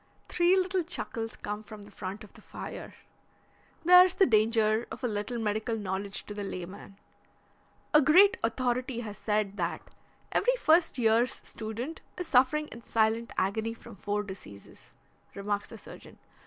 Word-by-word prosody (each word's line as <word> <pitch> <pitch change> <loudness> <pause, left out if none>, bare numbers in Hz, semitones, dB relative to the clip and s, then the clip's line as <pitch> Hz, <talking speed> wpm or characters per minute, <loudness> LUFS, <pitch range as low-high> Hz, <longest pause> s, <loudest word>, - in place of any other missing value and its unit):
Three 355 +2 +4
little 375 0 +1
chuckles 230 -9 -5
come 210 +1 -5
from 215 -1 -11
the 205 - -14
front 195 +2 -6
of 210 - -15
the - - -15
fire. - - -8 0.9
"There's 360 +1 +8
the 385 - +5
danger 220 -1 +3
of - - -9
a - - +2
little 210 +2 -3
medical 220 +1 -1
knowledge 195 -1 -3
to 210 - -7
the 205 0 -5
layman." 195 +1 -7 1.0
"A 300 - +8
great 360 +8 +6
authority 245 +1 -1
has 210 -3 -7
said 210 -2 -1
that 170 -2 -4 0.4
every - - +2
first 335 - +3
year's 230 +1 +3
student 230 +8 -6 0.2
is 360 - -3
suffering 275 +4 +3
in 235 - -11
silent 225 +1 +1
agony 220 +4 0
from 230 -1 -13
four 205 +2 -2
diseases," 185 - -12 0.5
remarks 205 +1 -2
the - - -10
surgeon. - - -13
225 Hz, 155 wpm, -29 LUFS, 205-265 Hz, 1.0 s, There's